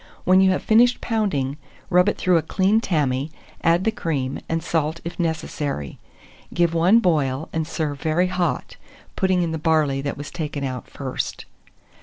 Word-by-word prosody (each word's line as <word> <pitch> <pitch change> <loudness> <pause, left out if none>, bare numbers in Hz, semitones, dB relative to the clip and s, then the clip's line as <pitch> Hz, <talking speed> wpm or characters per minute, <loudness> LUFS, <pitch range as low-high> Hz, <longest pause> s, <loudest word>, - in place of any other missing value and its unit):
When 185 +1 +5
you 190 - +5
have 185 - 0
finished 240 +3 +4
pounding, 155 - -1 0.3
rub 180 +3 +5
it - - -2
through 180 -2 +3
a - - +2
clean 195 +7 +2
tammy, 145 - 0 0.3
add 170 +2 +3
the 225 - +2
cream, 140 -10 -2
and 165 0 -1
salt 160 0 -1
if 170 - -6
necessary; 150 - -3 0.5
give 170 -1 +1
one 175 +6 +5
boil, 155 - +1
and 160 -1 -1
serve 150 -4 -3
very 160 +3 +2
hot, 180 -7 -2 0.4
putting 185 -2 +2
in 165 - -2
the 160 - -3
barley 150 -4 +2
that 140 0 -4
was 145 +1 -7
taken 150 -4 -4
out 130 -2 -5
first. 130 -2 -4
165 Hz, 170 wpm, -22 LUFS, 145-185 Hz, 0.5 s, When